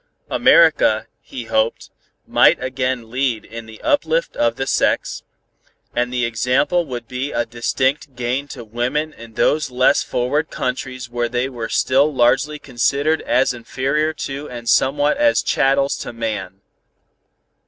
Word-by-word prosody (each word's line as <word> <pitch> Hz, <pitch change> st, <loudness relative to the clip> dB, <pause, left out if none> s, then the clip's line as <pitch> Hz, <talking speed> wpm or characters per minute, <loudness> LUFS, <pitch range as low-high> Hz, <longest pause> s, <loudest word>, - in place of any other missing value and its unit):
America, -, -, +4 dB, 0.2 s
he -, -, -8 dB
hoped, -, -, -1 dB, 0.3 s
might -, -, +5 dB
again 130 Hz, -3 st, -2 dB
lead 125 Hz, -3 st, -1 dB
in 115 Hz, 0 st, -9 dB
the 110 Hz, -1 st, -12 dB
uplift 485 Hz, +12 st, +1 dB
of 115 Hz, 0 st, +1 dB
the 135 Hz, -, -3 dB
sex, -, -, 0 dB, 0.7 s
and 125 Hz, 0 st, 0 dB
the 125 Hz, -1 st, 0 dB
example 125 Hz, +9 st, +1 dB
would 120 Hz, -3 st, -6 dB
be 130 Hz, +3 st, -4 dB
a 120 Hz, -, 0 dB
distinct 130 Hz, +4 st, -1 dB
gain 125 Hz, +3 st, -2 dB
to 125 Hz, -4 st, -8 dB
women 125 Hz, +8 st, -2 dB
in 115 Hz, -1 st, -13 dB
those 155 Hz, -1 st, +2 dB
less 130 Hz, +3 st, +3 dB
forward 130 Hz, +6 st, -1 dB
countries 130 Hz, 0 st, -4 dB
where 120 Hz, 0 st, -2 dB
they 125 Hz, +2 st, -1 dB
were 120 Hz, -4 st, -6 dB
still 140 Hz, +4 st, +2 dB
largely 135 Hz, +3 st, +2 dB
considered 140 Hz, +4 st, 0 dB
as 130 Hz, 0 st, +2 dB
inferior 135 Hz, +6 st, -1 dB
to 140 Hz, -1 st, -6 dB
and 120 Hz, -1 st, -8 dB
somewhat 145 Hz, -, +2 dB
as 290 Hz, 0 st, +3 dB
chattels 135 Hz, +1 st, +2 dB
to -, -, -6 dB
man. 105 Hz, -5 st, -4 dB
130 Hz, 145 wpm, -20 LUFS, 120-145 Hz, 0.7 s, might